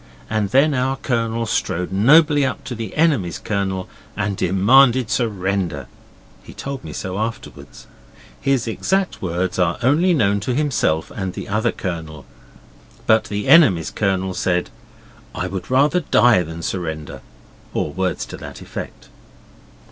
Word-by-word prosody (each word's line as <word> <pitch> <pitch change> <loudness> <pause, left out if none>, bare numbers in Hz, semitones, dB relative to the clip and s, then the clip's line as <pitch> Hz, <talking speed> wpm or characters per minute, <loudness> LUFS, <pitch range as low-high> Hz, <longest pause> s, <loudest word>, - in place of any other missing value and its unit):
And 110 -2 0
then 140 +7 +4
our 130 0 0
Colonel 115 -3 -1
strode 90 -4 -2
nobly 145 +9 +5
up 130 - -2
to 125 - -6
the 115 -4 -6
enemy's 140 - +1
Colonel 95 -3 -2 0.3
and 105 -2 -1
demanded 115 +7 +4
surrender. 95 - -1 0.6
He - - -14
told 140 -1 -6
me 80 - -8
so 95 +5 -5
afterwards. 115 +1 -6 0.6
His 135 -3 +1
exact 190 - -1
words 90 +1 -2
are 85 -2 +1
only 165 +8 +3
known 100 -7 +2
to 120 +5 -2
himself 125 - 0
and 95 -3 -4
the - - -7
other 110 +3 0
Colonel. 80 -5 -6 0.8
But 110 0 +4
the 105 0 -4
enemy's 115 - +5
Colonel 95 -2 -1
said, 90 -1 -1 0.6
'I - - -2
would 95 -2 -6
rather 140 +7 +3
die 120 - +4
than 80 0 -7
surrender,' 80 -5 -4 0.5
or 75 - -2
words 95 +2 -2
to - - -9
that - - -9
effect. - - -8
105 Hz, 140 wpm, -20 LUFS, 90-130 Hz, 0.8 s, nobly